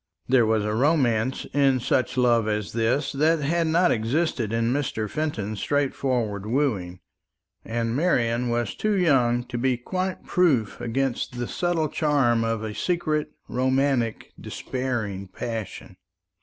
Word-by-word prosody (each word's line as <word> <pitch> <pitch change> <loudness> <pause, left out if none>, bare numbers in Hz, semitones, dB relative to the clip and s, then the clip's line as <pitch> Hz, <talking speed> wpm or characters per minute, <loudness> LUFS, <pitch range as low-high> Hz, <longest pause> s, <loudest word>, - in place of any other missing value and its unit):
There 125 -3 +4
was 110 -1 +1
a 105 - -1
romance 130 -2 +1
in 135 -2 +3
such 125 +1 0
love 120 -3 +3
as 105 -1 -2
this 120 +5 +1
that 155 +4 +2
had 165 +3 +1
not 175 +3 +3
existed 120 0 0
in 115 +1 +1
Mr. 125 -6 -2
Fenton's 110 -9 -3
straightforward 125 -6 -1
wooing; 105 -9 -1 0.6
and 115 0 -2
Marian 125 -6 +1
was 120 -2 -1
too 215 -1 0
young 125 -9 +3
to 120 -1 -5
be 130 0 +1
quite 185 +9 -3
proof 140 - +1
against 125 +1 -2
the 120 -1 -2
subtle 175 -3 0
charm 135 -7 +2
of 115 -1 -1
a 110 -1 -4
secret, 155 - -1 0.2
romantic, 130 -2 0
despairing 110 -7 -4
passion. 110 +2 -6
125 Hz, 135 wpm, -25 LUFS, 115-145 Hz, 0.6 s, There